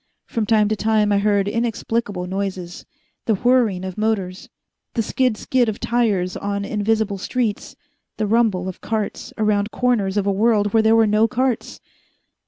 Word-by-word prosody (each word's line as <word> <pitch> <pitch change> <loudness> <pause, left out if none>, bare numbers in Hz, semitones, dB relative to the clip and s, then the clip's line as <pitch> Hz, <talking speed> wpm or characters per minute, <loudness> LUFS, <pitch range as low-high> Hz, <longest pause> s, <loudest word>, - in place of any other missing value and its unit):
From 225 -3 -2
time 215 -1 +4
to 215 - +1
time 215 0 +1
I 200 - +3
heard 200 -1 +2
inexplicable 225 -3 -2
noises 185 -2 -5 0.4
the 220 - +3
whirring 225 -5 +2
of 185 +1 -6
motors, 200 -4 -2 0.5
the 230 - +1
skid 250 0 0
skid 245 -1 +1
of 215 - -5
tires 210 -7 0
on 200 0 -3
invisible 210 -1 0
streets, 225 0 -2 0.4
the 215 - 0
rumble 210 -4 +1
of 185 - -7
carts 220 -2 -3
around 210 -1 +1
corners 215 -6 0
of 200 - +1
a 200 - +2
world 205 0 +2
where 225 - +5
there 220 +1 +4
were 225 0 +5
no 215 +1 +3
carts. 255 0 -2
215 Hz, 165 wpm, -21 LUFS, 200-225 Hz, 0.5 s, where